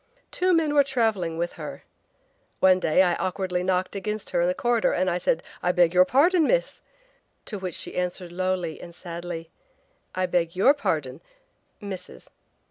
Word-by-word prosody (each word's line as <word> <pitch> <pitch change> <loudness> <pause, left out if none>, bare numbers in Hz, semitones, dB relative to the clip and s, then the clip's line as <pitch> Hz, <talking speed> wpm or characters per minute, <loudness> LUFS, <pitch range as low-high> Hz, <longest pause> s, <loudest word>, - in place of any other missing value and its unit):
Two 370 0 +1
men 315 -3 +1
were 285 -1 +6
traveling 220 -11 0
with 175 +1 -2
her. - - -7 0.8
One 185 -1 +5
day 180 +1 +3
I 175 -2 +2
awkwardly 185 -1 -2
knocked 185 +1 -1
against 210 +1 -4
her - - +1
in 175 - +2
a - - +1
corridor 240 -2 +1
and 185 +1 +1
I 175 - -1
said, 165 -1 0 0.2
'I 180 - +1
beg 175 -1 +3
your 180 0 +6
pardon, 310 - +4
Miss!' - - 0 0.6
To 210 - -5
which 185 -3 -4
she - - -4
answered 180 0 -3
lowly 180 -2 -2
and 170 -1 -10
sadly: 170 -1 -7 0.6
'I 185 0 +1
beg 175 -1 0
YOUR 225 +10 +5
pardon, 155 - -2 0.6
–Mrs!' 190 - -8
185 Hz, 170 wpm, -25 LUFS, 175-210 Hz, 0.8 s, were